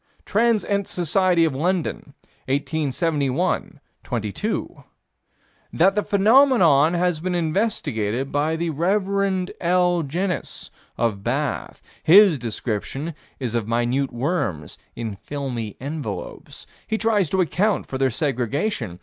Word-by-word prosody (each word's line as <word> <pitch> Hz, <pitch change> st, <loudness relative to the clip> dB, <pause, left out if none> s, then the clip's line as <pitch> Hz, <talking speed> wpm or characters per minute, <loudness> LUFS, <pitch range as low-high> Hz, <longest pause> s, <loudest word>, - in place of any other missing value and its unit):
Trans. 225 Hz, 0 st, +2 dB
Ent. 200 Hz, -1 st, -1 dB
Soc. 180 Hz, +1 st, +1 dB
of 165 Hz, -3 st, +3 dB
London, 160 Hz, -1 st, -2 dB, 0.3 s
1871 145 Hz, +2 st, -1 dB, 0.2 s
proc. 120 Hz, -4 st, -3 dB
xxii: 100 Hz, -, -2 dB, 1.1 s
That 190 Hz, +4 st, +3 dB
the 210 Hz, -, +1 dB
phenomenon 200 Hz, -, +4 dB
has 175 Hz, -2 st, +1 dB
been 180 Hz, +2 st, -2 dB
investigated 140 Hz, -, -1 dB
by 150 Hz, +3 st, 0 dB
the 165 Hz, 0 st, -2 dB
Rev. 190 Hz, +3 st, 0 dB
L. 175 Hz, 0 st, +2 dB
Jenyns, 175 Hz, +5 st, -4 dB, 0.3 s
of 110 Hz, -4 st, -1 dB
Bath. 135 Hz, +5 st, -2 dB, 0.2 s
His 185 Hz, -3 st, +7 dB
description 120 Hz, +6 st, -4 dB, 0.3 s
is 125 Hz, -4 st, -3 dB
of 115 Hz, -3 st, -1 dB
minute 120 Hz, +4 st, 0 dB
worms 120 Hz, -, -2 dB, 0.2 s
in 110 Hz, -4 st, -5 dB
filmy 120 Hz, -2 st, -5 dB
envelopes. 135 Hz, -, -6 dB, 0.2 s
He 220 Hz, -, 0 dB
tries 215 Hz, -6 st, +1 dB
to 190 Hz, -, 0 dB
account 185 Hz, +5 st, +1 dB
for 130 Hz, -, -5 dB
their 135 Hz, -1 st, +3 dB
segregation. 130 Hz, -, -2 dB
155 Hz, 115 wpm, -23 LUFS, 130-185 Hz, 1.1 s, His